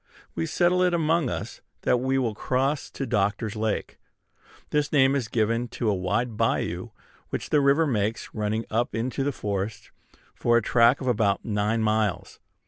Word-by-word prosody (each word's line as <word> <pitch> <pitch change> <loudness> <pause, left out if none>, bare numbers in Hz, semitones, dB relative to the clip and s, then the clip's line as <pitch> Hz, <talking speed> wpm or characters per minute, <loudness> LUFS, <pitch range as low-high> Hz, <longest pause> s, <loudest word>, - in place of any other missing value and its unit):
We 80 0 -2
settle 180 +1 +2
it 180 -1 +3
among 160 -3 +1
us - - -5 0.2
that 125 - +3
we 130 +2 0
will 120 -4 0
cross 135 +6 -1
to 135 - -5
Doctor's 105 -1 0
Lake. 110 -1 -2 0.7
This 150 0 +1
name 135 -2 +4
is 130 -5 -1
given 115 +1 0
to 110 -3 +1
a - - +1
wide 105 +6 -1
bayou - - -1 0.4
which - - -4
the 150 - +4
river 140 +4 +4
makes, 110 -5 -2
running 110 +1 -2
up 120 +2 0
into 125 +4 -2
the 145 - 0
forest 100 -3 -4 0.4
for 120 0 +2
a - - +3
track 115 +4 +4
of 130 - -4
about 105 -5 +1
nine 105 +1 0
miles. 110 -3 -1
115 Hz, 170 wpm, -26 LUFS, 105-135 Hz, 0.7 s, name